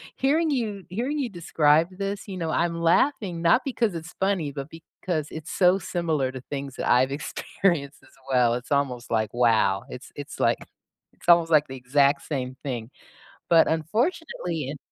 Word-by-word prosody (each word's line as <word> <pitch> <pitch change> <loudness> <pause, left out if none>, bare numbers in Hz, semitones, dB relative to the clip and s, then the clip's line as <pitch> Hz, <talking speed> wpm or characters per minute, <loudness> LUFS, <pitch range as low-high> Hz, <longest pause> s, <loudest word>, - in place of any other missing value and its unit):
hearing 310 +4 +2
you 215 -8 -2
hearing 255 +10 -2
you 255 -4 -1
describe 165 -2 +2
this, 200 +1 -3
you 190 -2 -6
know, 165 -2 -2
I'm 170 +1 0
laughing 180 - +2
not 170 +9 +4
because 235 -7 0
it's 165 +1 -7
funny, 190 -7 0
but 140 0 -6
because 160 -1 -5
it's 160 -1 -7
so 185 0 +4
similar 160 -7 -1
to 130 -1 -8
things 140 -2 -5
that - - -2
I've 130 +2 +4
experienced 145 +1 -2
as 130 - -21 0.2
well, 120 -2 +4
it's 125 +3 -7
almost 130 -4 -1
like, 110 -2 +1
wow, 110 -5 +3
it's - - -9
it's - - -8
like, - - +3 0.6
it's - - -19
almost 170 -1 +6
like 150 -1 +5
the 130 - -7
exact 140 +2 +2
same 130 -3 -3
thing, 120 -5 -4 0.6
but 165 -1 +6
unfortunately 170 - -1
in 145 - -5
160 Hz, 175 wpm, -25 LUFS, 135-190 Hz, 0.6 s, almost